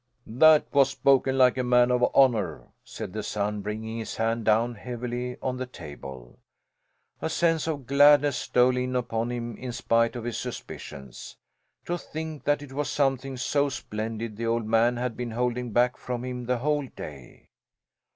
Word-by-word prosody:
'" 125 0 -45
"That 155 +6 +5
was 140 -1 +5
spoken 135 -1 +2
like 130 0 +4
a - - +1
man 125 0 +4
of 125 0 +2
honour!" 125 -6 +2
said - - -7
the 110 - -3
son, 105 0 -2
bringing 110 +2 -5
his 110 - -5
hand 115 0 -1
down 115 +3 +3
heavily 125 +2 -5
on 130 -1 -1
the 130 0 -4
table. 70 - -10 0.8
A - - -1
sense 165 -1 +1
of 145 -5 -3
gladness 145 +1 +5
stole 125 +1 +2
in 125 0 -2
upon 120 -1 -1
him 120 -2 -4
in 125 -1 -5
spite 115 0 +1
of 120 - -5
his 120 0 -3
suspicions. 65 -3 -8 0.5
To 175 0 -2
think 160 -2 -7
that 145 0 +1
it 135 -2 -11
was 145 +1 -2
something 135 -1 0
so 140 +3 +1
splendid 110 -3 -5
the 115 0 -2
old 115 -1 0
man 115 +2 +3
had 125 -1 -2
been 120 -1 -4
holding 125 +1 -2
back 120 +3 +2
from 125 0 -4
him 125 -1 -5
the 125 0 +1
whole 145 +2 0
day! 70 - -11
125 Hz, 175 wpm, -26 LUFS, 115-135 Hz, 0.8 s, That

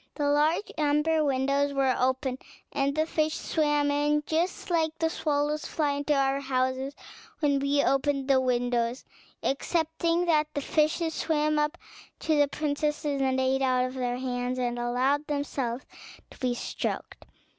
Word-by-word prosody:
The 290 -2 0
large 305 +7 +2
amber 300 +2 +2
windows 280 +1 +1
were 270 -2 +2
open, 260 0 0 0.3
and 280 0 0
the 310 +1 +2
fish 310 -1 0
swam 295 -2 +1
in, 295 +1 +1
just 345 +3 -1
as 325 -2 +2
the 325 0 0
swallows 295 -1 -1
fly 300 -3 0
into 285 +1 0
our 275 0 +2
houses 260 0 -1 0.4
when 285 -3 +2
we 280 +1 +2
open 275 0 +1
the 270 -1 +4
windows, 245 -1 0 0.4
excepting 330 +4 0
that 310 -3 +3
the 285 - 0
fishes 315 +3 +1
swam 305 -1 +1
up 300 +3 0 0.4
to 315 - +1
the 290 -1 +4
princesses, 295 -1 -1
ate 260 0 +1
out 255 -1 +2
of 255 - -5
their 245 -2 -2
hands, 250 0 -2
and 245 -1 -1
allowed 255 +5 +1
themselves 275 -4 -2 0.5
to - - -15
be 250 -2 0
stroked. - - -4
285 Hz, 150 wpm, -28 LUFS, 260-300 Hz, 0.5 s, the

